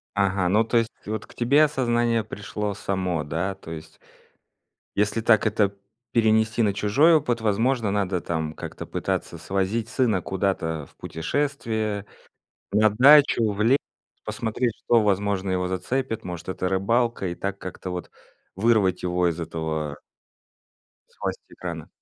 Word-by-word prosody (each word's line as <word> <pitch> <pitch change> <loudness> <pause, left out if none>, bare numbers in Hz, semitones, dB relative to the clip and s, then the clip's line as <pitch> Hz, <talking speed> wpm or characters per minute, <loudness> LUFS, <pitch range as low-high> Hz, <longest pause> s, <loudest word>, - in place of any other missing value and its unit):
Ага, 95 -2 +2
ну, 105 +4 +4
то 115 - +1
есть 115 0 +2 0.2
вот 110 0 -4
к - - -17
тебе 140 +6 +4
осознание 120 -5 +1
пришло 105 0 -4
само, 95 -5 -2
да? 85 +6 -2
То 80 -4 -11
есть 80 -1 -9 1.0
если 105 +2 +1
так 110 -1 +4
это 105 -2 +1 0.4
перенести 110 0 +3
на 105 -3 +2
чужой 110 - +4
опыт, 125 -6 +1
возможно, 115 +2 +1
надо 100 -3 0
там 80 -2 -3
как-то - - -7
пытаться 85 - -3
свозить 95 +6 -1
сына 115 -7 +1
куда-то 90 -5 -1
в - - -26
путешествие, 110 - -2 0.7
на 110 +1 +5
дачу, 130 -1 +6
в 100 - -6
лес, 125 +6 +4 0.5
посмотреть, 115 +1 -1
что, 115 -2 +4
возможно, 100 -1 0
его 90 0 0
зацепит, 110 +6 -2
может, 90 -1 -7
это 95 0 -2
рыбалка, 115 +3 +1
и 85 - -3
так 100 +2 -4
как-то 90 0 -7
вот 90 0 -5 0.4
вырвать 100 -3 +2
его 90 0 +1
из 85 0 -3
этого 80 -2 -3 1.1
из - - -30
власти - - -4
экрана. 85 -4 -6
100 Hz, 145 wpm, -25 LUFS, 90-115 Hz, 1.1 s, дачу